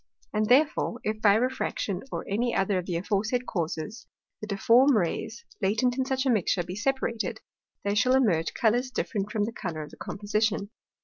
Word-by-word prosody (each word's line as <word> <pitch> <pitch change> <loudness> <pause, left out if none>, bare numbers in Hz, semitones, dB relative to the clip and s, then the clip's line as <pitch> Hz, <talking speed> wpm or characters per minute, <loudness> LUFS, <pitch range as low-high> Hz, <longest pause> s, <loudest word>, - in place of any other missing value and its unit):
And 215 0 +1
therefore, 260 -2 +3
if 215 0 -2
by 205 -2 +6
Refraction, 225 -5 -1
or - - -4
any 235 +4 0
other 195 -1 +1
of 180 - -7
the 175 - -2
aforesaid 210 +7 -1
Causes, 170 +3 -4 0.3
the 215 - -5
difform 235 +7 +4
Rays, 215 +4 -2 0.2
latent 220 +5 +2
in 260 0 0
such 265 0 -1
a 260 - +3
mixture, 195 -4 +1
be 180 +2 -6
separated, 235 0 -1 0.4
there 200 0 0
shall 250 +5 +4
emerge 175 -12 +2
Colours 245 +2 +2
different 210 -4 -3
from 215 -2 0
the 220 - -2
colour 165 -8 -4
of 150 - -11
the - - -14
Composition. 210 0 -1
215 Hz, 180 wpm, -27 LUFS, 195-245 Hz, 0.4 s, by